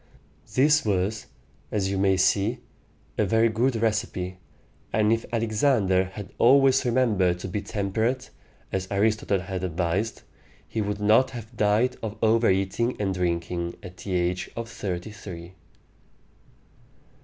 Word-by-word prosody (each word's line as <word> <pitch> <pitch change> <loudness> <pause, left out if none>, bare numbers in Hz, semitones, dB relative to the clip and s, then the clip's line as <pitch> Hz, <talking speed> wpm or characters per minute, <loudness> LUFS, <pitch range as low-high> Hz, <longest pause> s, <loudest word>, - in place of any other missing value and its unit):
This 150 +3 +4
was, 105 +1 -1 0.4
as 100 -2 0
you 95 - -1
may 95 -1 +3
see, 100 +5 +2 0.6
a - - +4
very 115 +3 +3
good 120 +4 +1
recipe; 105 -5 -1 0.5
and 110 +1 +3
if 115 0 -2
Alexander 110 -4 +2
had 95 +2 -9
always 135 +2 +5
remembered 110 -8 +2
to 90 - -6
be 100 +3 -3
temperate, 110 +6 -2 0.4
as 95 0 -2
Aristotle 100 -1 +1
had 95 0 -5
advised, 90 +5 -1 0.4
he 110 - -2
would 105 0 -2
not 110 +5 +4
have 120 -2 -9
died 110 +4 +2
of 110 -1 -5
over 115 +1 +4
eating 95 +6 0
and 100 -2 0
drinking 85 -1 -2
at 90 0 -10
the 95 - -5
age 90 0 0
of 115 0 -4
thirty 100 -4 -5
three. 90 -4 -9
105 Hz, 135 wpm, -25 LUFS, 95-115 Hz, 0.6 s, always